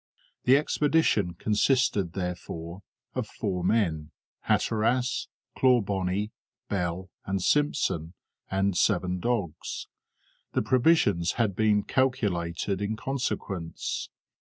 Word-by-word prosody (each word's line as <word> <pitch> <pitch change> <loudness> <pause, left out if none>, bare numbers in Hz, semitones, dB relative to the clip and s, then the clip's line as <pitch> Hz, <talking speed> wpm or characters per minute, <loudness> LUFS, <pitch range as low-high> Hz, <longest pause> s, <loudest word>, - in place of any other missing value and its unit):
The 130 +2 +7
expedition 145 - +2
consisted, 105 -5 +2
therefore, 90 -1 -5 0.3
of 125 -4 -2
four 95 -5 -3
men, 85 -7 +1 0.4
Hatteras, 120 +3 +1 0.3
Clawbonny, 100 -5 +2 0.4
Bell, 90 -1 -2 0.2
and 95 0 0
Simpson, 90 - +1 0.3
and 95 0 +1
seven 90 +1 +2
dogs. 100 -7 -2 0.7
The - - +1
provisions 120 - +3
had 110 -5 0
been 105 -1 +3
calculated 100 -7 0
in 105 +2 -1
consequence. 110 -9 -3
100 Hz, 90 wpm, -27 LUFS, 90-120 Hz, 0.7 s, The